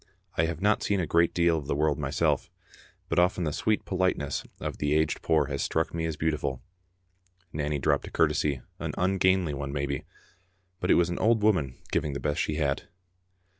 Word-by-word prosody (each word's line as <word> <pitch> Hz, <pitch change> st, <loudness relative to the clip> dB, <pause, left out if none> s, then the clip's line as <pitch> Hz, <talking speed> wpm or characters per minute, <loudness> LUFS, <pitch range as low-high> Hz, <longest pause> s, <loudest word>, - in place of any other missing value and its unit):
I 80 Hz, -, +3 dB
have 80 Hz, 0 st, -4 dB
not 105 Hz, +1 st, +3 dB
seen 100 Hz, -1 st, +1 dB
a 90 Hz, -, 0 dB
great 85 Hz, +1 st, +3 dB
deal 85 Hz, -2 st, +2 dB
of 70 Hz, -, -9 dB
the 75 Hz, -, 0 dB
world 75 Hz, 0 st, +1 dB
myself, -, -, 0 dB, 0.6 s
but -, -, +1 dB
often 90 Hz, 0 st, +2 dB
the 75 Hz, -3 st, -1 dB
sweet 110 Hz, +6 st, 0 dB
politeness 95 Hz, -7 st, 0 dB, 0.2 s
of -, -, -5 dB
the 75 Hz, 0 st, +1 dB
aged 80 Hz, -1 st, +1 dB
poor 80 Hz, -2 st, +2 dB
has 70 Hz, -1 st, -3 dB
struck 80 Hz, 0 st, 0 dB
me 80 Hz, -1 st, -2 dB
as 80 Hz, -, -4 dB
beautiful. 75 Hz, -5 st, -1 dB, 0.9 s
Nanny 75 Hz, 0 st, -1 dB
dropped 70 Hz, -, +1 dB
a -, -, -9 dB
curtesy, 70 Hz, -4 st, +1 dB, 0.2 s
an -, -, -3 dB
ungainly 95 Hz, -3 st, +2 dB
one 70 Hz, 0 st, -4 dB
maybe, 70 Hz, -1 st, -2 dB, 0.7 s
but -, -, -2 dB
it -, -, +6 dB
was 85 Hz, 0 st, +3 dB
an 85 Hz, -, -3 dB
old 110 Hz, -1 st, +3 dB
woman 80 Hz, -12 st, +2 dB
giving 75 Hz, -2 st, 0 dB
the 70 Hz, -, -3 dB
best 75 Hz, +1 st, -1 dB
she 75 Hz, -, -1 dB
had. 70 Hz, -3 st, -1 dB
80 Hz, 195 wpm, -28 LUFS, 70-90 Hz, 0.9 s, it